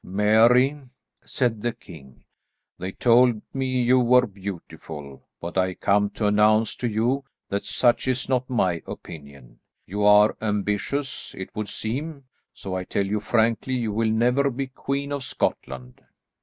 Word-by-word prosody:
"Mary," 115 Hz, +8 st, +3 dB, 0.4 s
said 120 Hz, -5 st, -1 dB
the 120 Hz, -, 0 dB
king, 70 Hz, -, -15 dB, 0.6 s
"they 95 Hz, +2 st, -4 dB
told 120 Hz, +1 st, +4 dB
me 135 Hz, -1 st, -1 dB, 0.2 s
you 125 Hz, +2 st, +4 dB
were 125 Hz, +1 st, +5 dB
beautiful, 85 Hz, -, -9 dB, 0.2 s
but 85 Hz, +2 st, -3 dB
I 95 Hz, 0 st, 0 dB
come 100 Hz, 0 st, +2 dB
to 110 Hz, -, -1 dB
announce 105 Hz, +1 st, +3 dB
to 125 Hz, -, -2 dB
you 120 Hz, +5 st, 0 dB, 0.3 s
that 100 Hz, 0 st, -2 dB
such 120 Hz, +1 st, +1 dB
is 130 Hz, 0 st, -1 dB
not 130 Hz, -1 st, 0 dB
my 90 Hz, -9 st, 0 dB
opinion. 70 Hz, -5 st, -11 dB, 0.3 s
You 100 Hz, +3 st, -3 dB
are 105 Hz, +1 st, +6 dB
ambitious, 105 Hz, +6 st, -2 dB
it 95 Hz, +2 st, -8 dB
would 105 Hz, -2 st, -4 dB
seem, 140 Hz, +8 st, -4 dB, 0.3 s
so 95 Hz, -, -7 dB
I 95 Hz, -, -2 dB
tell 100 Hz, +2 st, -1 dB
you 105 Hz, +2 st, -1 dB
frankly, 115 Hz, +3 st, 0 dB
you 115 Hz, -4 st, -1 dB
will 110 Hz, +1 st, +1 dB
never 125 Hz, +5 st, +2 dB
be 135 Hz, +1 st, -3 dB
Queen 140 Hz, +2 st, -4 dB
of 140 Hz, -2 st, -3 dB
Scotland." 65 Hz, -, -4 dB
110 Hz, 150 wpm, -24 LUFS, 100-125 Hz, 0.6 s, are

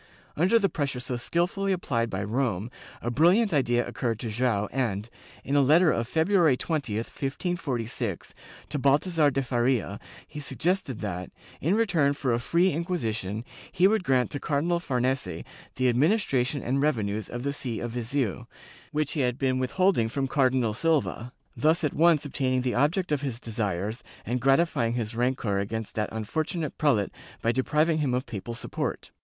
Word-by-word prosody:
Under 185 Hz, +9 st, +4 dB
the 200 Hz, -3 st, +3 dB
pressure 140 Hz, -7 st, -2 dB
so 125 Hz, 0 st, -3 dB
skilfully 175 Hz, +9 st, 0 dB
applied 120 Hz, -11 st, 0 dB
by 95 Hz, 0 st, -3 dB
Rome, 115 Hz, -1 st, -1 dB, 0.3 s
a 120 Hz, -, -1 dB
brilliant 175 Hz, -, +4 dB
idea 120 Hz, -4 st, +2 dB
occurred 115 Hz, -4 st, -2 dB
to 115 Hz, -, -3 dB
Joao 110 Hz, -3 st, +1 dB
and, 110 Hz, -5 st, -1 dB, 0.4 s
in 140 Hz, -, -1 dB
a 145 Hz, -, +6 dB
letter 155 Hz, +5 st, +5 dB
of 115 Hz, 0 st, -1 dB
February 160 Hz, -2 st, +3 dB
20, 145 Hz, -10 st, -2 dB
1546, 130 Hz, -, -3 dB, 0.4 s
to 145 Hz, -, -2 dB
Balthazar 150 Hz, +3 st, +3 dB
de 135 Hz, 0 st, -1 dB
Faria, 120 Hz, -5 st, 0 dB, 0.3 s
he 150 Hz, -, -8 dB
suggested 145 Hz, -, -1 dB
that, 90 Hz, -4 st, -4 dB, 0.3 s
in 170 Hz, +7 st, +2 dB
return 175 Hz, -11 st, +2 dB
for 135 Hz, -4 st, -1 dB
a 115 Hz, -, +1 dB
free 170 Hz, +9 st, +2 dB
Inquisition, 115 Hz, -, -2 dB, 0.3 s
he 180 Hz, +2 st, +4 dB
would 220 Hz, -1 st, +1 dB
grant 130 Hz, -6 st, +2 dB
to 145 Hz, -, -3 dB
Cardinal 165 Hz, +5 st, 0 dB
Farnese 125 Hz, -, -1 dB, 0.3 s
the 130 Hz, -1 st, +2 dB
adminis 165 Hz, -, +3 dB
tration 135 Hz, +1 st, 0 dB
and 135 Hz, +2 st, +1 dB
revenues 110 Hz, -8 st, 0 dB
of 120 Hz, 0 st, -5 dB
the 140 Hz, 0 st, -1 dB
see 130 Hz, -6 st, -3 dB
of 120 Hz, -, -4 dB
Viseu, 120 Hz, -, -2 dB, 0.4 s
which 150 Hz, -1 st, 0 dB
he 155 Hz, -, -2 dB
had 125 Hz, -2 st, +1 dB
been 130 Hz, -2 st, +1 dB
with 130 Hz, -1 st, -2 dB
holding 185 Hz, -, +3 dB
from 135 Hz, +3 st, -1 dB
Cardinal 130 Hz, -5 st, +2 dB
Silva, 135 Hz, -4 st, 0 dB, 0.2 s
thus 160 Hz, +3 st, +2 dB
at 150 Hz, -, 0 dB
once 160 Hz, -2 st, +4 dB
obtaining 130 Hz, -2 st, 0 dB
the 125 Hz, -1 st, -1 dB
object 160 Hz, +7 st, +1 dB
of 145 Hz, -2 st, +1 dB
his 130 Hz, -5 st, -3 dB
desires 105 Hz, -2 st, -3 dB, 0.2 s
and 125 Hz, +2 st, -1 dB
gratifying 135 Hz, -3 st, +2 dB
his 115 Hz, -2 st, -3 dB
rancor 120 Hz, -4 st, 0 dB
against 110 Hz, +2 st, -4 dB
that 105 Hz, -1 st, -1 dB
unfortunate 155 Hz, -, -3 dB
prelate 120 Hz, -10 st, +2 dB, 0.3 s
by 115 Hz, -, +3 dB
depriving 150 Hz, +5 st, +1 dB
him 135 Hz, -5 st, +1 dB
of 125 Hz, -, -2 dB
papal 115 Hz, +2 st, -6 dB
support. -, -, -4 dB
130 Hz, 170 wpm, -27 LUFS, 115-155 Hz, 0.4 s, a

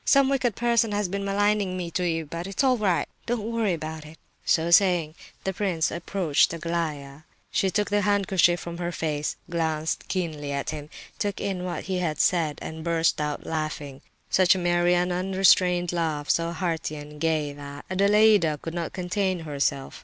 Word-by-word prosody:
Some 275 Hz, -1 st, +4 dB
wicked 255 Hz, -6 st, +1 dB
person 235 Hz, -2 st, +2 dB
has 205 Hz, -1 st, 0 dB
been 200 Hz, +2 st, -3 dB
maligning 200 Hz, -1 st, +1 dB
me 175 Hz, -2 st, -4 dB
to 180 Hz, +2 st, -1 dB
you; 165 Hz, -2 st, -1 dB
but 170 Hz, +4 st, -6 dB
it's 195 Hz, +8 st, -1 dB
all 260 Hz, -1 st, +4 dB
right. 190 Hz, -5 st, +1 dB, 0.2 s
Don't 230 Hz, -2 st, -2 dB
worry 225 Hz, -5 st, +1 dB
about 155 Hz, -1 st, -5 dB
it." 155 Hz, +1 st, -13 dB, 0.3 s
So 165 Hz, +1 st, +2 dB
saying, 175 Hz, -4 st, +4 dB, 0.3 s
the 190 Hz, -, -1 dB
prince 180 Hz, -4 st, 0 dB
approached 170 Hz, -3 st, +1 dB
Aglaya. 155 Hz, -4 st, -3 dB, 0.3 s
She 195 Hz, -, +1 dB
took 205 Hz, +2 st, -1 dB
the 205 Hz, 0 st, +3 dB
handkerchief 190 Hz, -3 st, +3 dB
from 170 Hz, -1 st, -7 dB
her 175 Hz, 0 st, -2 dB
face, 150 Hz, -3 st, -2 dB
glanced 160 Hz, -2 st, -2 dB
keenly 155 Hz, -6 st, -3 dB
at 140 Hz, +1 st, -2 dB
him, 150 Hz, -1 st, -7 dB, 0.3 s
took 205 Hz, -2 st, -2 dB
in 190 Hz, -3 st, -3 dB
what 180 Hz, -, -4 dB
he 185 Hz, -1 st, -2 dB
had 155 Hz, -4 st, -2 dB
said, 165 Hz, -5 st, +2 dB
and 160 Hz, 0 st, -6 dB
burst 165 Hz, -2 st, +1 dB
out 150 Hz, -1 st, -3 dB
laughing—such 155 Hz, +4 st, -1 dB
a -, -, -1 dB
merry, 175 Hz, 0 st, +2 dB
unrestrained 180 Hz, 0 st, +3 dB
laugh, 155 Hz, -4 st, 0 dB
so 170 Hz, 0 st, 0 dB
hearty 165 Hz, -2 st, -2 dB
and 150 Hz, 0 st, -10 dB
gay, 155 Hz, -3 st, 0 dB
that 145 Hz, 0 st, -9 dB
Adelaida 200 Hz, -4 st, +4 dB
could 165 Hz, -, -6 dB
not 170 Hz, -2 st, -3 dB
contain 185 Hz, 0 st, -1 dB
herself. 140 Hz, -3 st, -2 dB
175 Hz, 175 wpm, -26 LUFS, 155-195 Hz, 0.3 s, Some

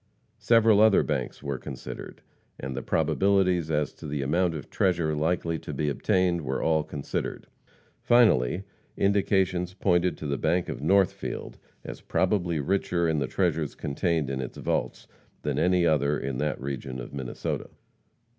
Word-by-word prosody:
Several 115 Hz, -3 st, +5 dB
other 110 Hz, -2 st, +6 dB
banks -, -, -3 dB
were 70 Hz, -3 st, -3 dB
considered, -, -, -8 dB, 0.4 s
and 65 Hz, 0 st, -5 dB
the 65 Hz, -, -3 dB
probabilities 90 Hz, +2 st, +2 dB
as 75 Hz, -3 st, 0 dB
to -, -, -10 dB
the 70 Hz, -1 st, -2 dB
amount 85 Hz, +4 st, +1 dB
of 75 Hz, -, -7 dB
treasure 85 Hz, -4 st, +1 dB
likely 80 Hz, +1 st, 0 dB
to -, -, -7 dB
be 75 Hz, +2 st, 0 dB
obtained 85 Hz, +5 st, +1 dB
were 65 Hz, -2 st, -2 dB
all 80 Hz, -1 st, +2 dB
considered. 70 Hz, -1 st, -4 dB, 0.6 s
Finally, 100 Hz, -, +4 dB, 0.3 s
indications 95 Hz, -2 st, +1 dB
pointed 90 Hz, -4 st, +1 dB
to -, -, -7 dB
the 70 Hz, -1 st, -2 dB
bank 90 Hz, 0 st, +1 dB
of -, -, -5 dB
Northfield 95 Hz, +4 st, 0 dB, 0.2 s
as -, -, -8 dB
probably 85 Hz, -6 st, 0 dB
richer 85 Hz, +1 st, 0 dB
in 80 Hz, -2 st, +1 dB
the 70 Hz, -, -1 dB
treasures 80 Hz, -5 st, -1 dB
contained 75 Hz, 0 st, -1 dB
in 65 Hz, -1 st, -2 dB
its 65 Hz, -, -7 dB
vaults -, -, -2 dB, 0.4 s
than -, -, -1 dB
any 90 Hz, -1 st, +3 dB
other 75 Hz, -2 st, +2 dB
in 65 Hz, -2 st, -4 dB
that 75 Hz, +2 st, -1 dB
region 65 Hz, -1 st, -5 dB
of -, -, -8 dB
Minnesota. 65 Hz, -3 st, -4 dB
80 Hz, 155 wpm, -27 LUFS, 70-90 Hz, 0.6 s, other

